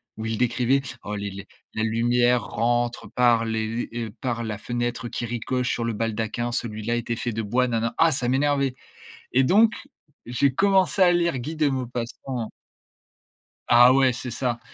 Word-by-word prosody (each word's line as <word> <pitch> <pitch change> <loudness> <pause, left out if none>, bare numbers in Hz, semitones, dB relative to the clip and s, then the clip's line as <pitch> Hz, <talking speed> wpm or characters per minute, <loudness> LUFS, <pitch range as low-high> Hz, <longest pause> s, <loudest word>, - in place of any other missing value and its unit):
où 110 +1 -6
il 110 -1 -2
décrivait: 125 +2 +2 0.2
«Oh 105 0 -4
les 100 0 -4
les 100 0 -9 0.3
la 110 - 0
lumière 120 +1 +2
rentre 120 +3 -1
par 120 -2 +3
les 110 -1 -1
les 115 +2 -3 0.2
heu, - - -10
par 120 -2 -2
la 105 -2 -4
fenêtre 120 +1 -3
qui 120 - -4
ricoche 125 +2 -2
sur 120 - -2
le 115 - -1
baldaquin, 115 +2 -2
celui-là 115 0 -2
était 120 0 -2
fait 120 -1 -3
de 110 0 -3
bois» 125 +5 +1
nana. 115 -1 -1
Ah 165 0 +5
ça 125 -3 -1
m'énervait 140 -1 +1 0.6
et 135 - +4
donc, 215 - +4 0.5
j'ai 130 +2 +1
commencé 195 +1 +3
à 175 -1 +6
lire 170 -4 +1
Guy 155 +6 -5
de 150 -2 +2
Maupassant. 125 -2 -4 1.2
Ah 120 +1 +7
ouais, 130 -2 +4
c'est 120 0 -6
ça. 120 -2 -2
120 Hz, 175 wpm, -24 LUFS, 115-130 Hz, 1.2 s, Ah